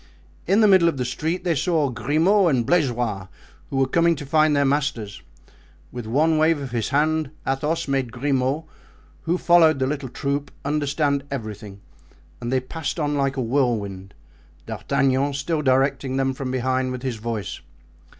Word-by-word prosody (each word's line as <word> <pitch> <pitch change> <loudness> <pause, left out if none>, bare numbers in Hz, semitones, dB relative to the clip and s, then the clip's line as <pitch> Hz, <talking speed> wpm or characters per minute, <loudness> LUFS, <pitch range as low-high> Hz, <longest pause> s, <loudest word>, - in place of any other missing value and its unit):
In 195 +5 +4
the 215 - +6
middle 185 -4 +6
of 160 - -4
the 125 - -1
street 160 +8 -2
they 175 -2 +1
saw 155 -2 +1
Grimaud 170 - +2
and 125 -6 +1
Blaisois, 120 - 0 0.4
who 135 - -3
were 135 - +3
coming 170 +4 +3
to 145 - -7
find 155 +1 +3
their 140 0 +3
masters. 135 -7 -1 0.7
With 120 -3 -7
one 155 +6 +2
wave 160 0 +3
of 135 -3 -6
his 115 -3 -2
hand 155 +1 +1 0.2
Athos 150 +5 -1
made 135 -3 -1
Grimaud, 135 +3 0 0.6
who 170 +2 +1
followed 170 -3 +5
the 130 - 0
little 140 -1 -3
troop, 140 +3 -3 0.2
understand 145 -1 0
everything, 105 -6 -7 0.6
and 120 0 -3
they 130 - +2
passed 145 +5 -5
on 145 -1 0
like 135 -1 0
a 130 - 0
whirlwind, 110 -7 -1 0.5
D'Artagnan 135 +1 0
still 150 +3 -1
directing 135 0 +1
them 135 0 +1
from 130 0 -5
behind 130 0 0
with 125 0 -6
his 130 -4 -2
voice. 110 -3 -5
135 Hz, 165 wpm, -23 LUFS, 125-155 Hz, 0.7 s, the